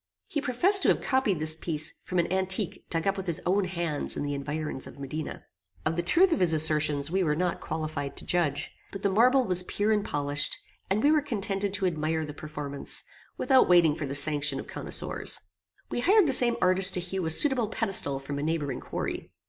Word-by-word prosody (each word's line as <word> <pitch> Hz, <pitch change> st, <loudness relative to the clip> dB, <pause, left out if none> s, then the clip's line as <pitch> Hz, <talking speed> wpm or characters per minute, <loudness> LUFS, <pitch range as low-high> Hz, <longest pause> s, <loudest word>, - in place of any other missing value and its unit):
He 295 Hz, -, -3 dB
professed 345 Hz, +10 st, +3 dB
to -, -, +1 dB
have -, -, +2 dB
copied 260 Hz, -, 0 dB
this 155 Hz, +1 st, 0 dB
piece 160 Hz, -1 st, -4 dB
from 185 Hz, -, -5 dB
an 170 Hz, +1 st, 0 dB
antique 190 Hz, +1 st, -2 dB
dug 165 Hz, -1 st, -1 dB
up 195 Hz, 0 st, 0 dB
with 190 Hz, -1 st, -6 dB
his 170 Hz, -3 st, 0 dB
own 190 Hz, +2 st, +1 dB
hands 170 Hz, -5 st, -3 dB
in -, -, -3 dB
the 145 Hz, 0 st, -3 dB
environs 150 Hz, 0 st, -5 dB
of -, -, -13 dB
Modena. 140 Hz, +3 st, -6 dB, 0.4 s
Of 165 Hz, -, 0 dB
the 175 Hz, -, 0 dB
truth 345 Hz, -, +3 dB
of -, -, -1 dB
his 175 Hz, -3 st, +3 dB
assertions 150 Hz, -1 st, +5 dB
we 190 Hz, +1 st, +1 dB
were 150 Hz, -3 st, 0 dB
not 175 Hz, +1 st, -2 dB
qualified 155 Hz, -3 st, -5 dB
to -, -, -5 dB
judge; 150 Hz, -5 st, -1 dB, 0.2 s
but 195 Hz, -, -8 dB
the 200 Hz, -, +1 dB
marble 250 Hz, +6 st, +3 dB
was 180 Hz, -1 st, +2 dB
pure 205 Hz, +4 st, -2 dB
and 210 Hz, -1 st, +1 dB
polished, 145 Hz, -2 st, 0 dB, 0.3 s
and 200 Hz, +3 st, 0 dB
we 290 Hz, -, +4 dB
were 310 Hz, -1 st, +3 dB
contented 200 Hz, -7 st, -2 dB
to 200 Hz, -, -2 dB
admire 160 Hz, -2 st, -1 dB
the 150 Hz, -, -8 dB
performance, 145 Hz, -2 st, -5 dB, 0.3 s
without 265 Hz, -7 st, +3 dB
waiting 170 Hz, -4 st, +5 dB
for 150 Hz, -1 st, -5 dB
the 140 Hz, -, -4 dB
sanction 145 Hz, -1 st, +3 dB
of -, -, -7 dB
connoisseurs. -, -, -3 dB, 0.5 s
We -, -, -1 dB
hired 390 Hz, -, +4 dB
the 275 Hz, -, +3 dB
same 240 Hz, -2 st, +5 dB
artist 185 Hz, +1 st, +4 dB
to -, -, -1 dB
hew 185 Hz, +1 st, -4 dB
a -, -, -1 dB
suitable 250 Hz, -, +4 dB
pedestal 165 Hz, -10 st, +2 dB
from 140 Hz, +1 st, -6 dB
a -, -, -4 dB
neighbouring 150 Hz, -5 st, -2 dB
quarry. -, -, -5 dB
175 Hz, 215 wpm, -27 LUFS, 150-200 Hz, 0.5 s, assertions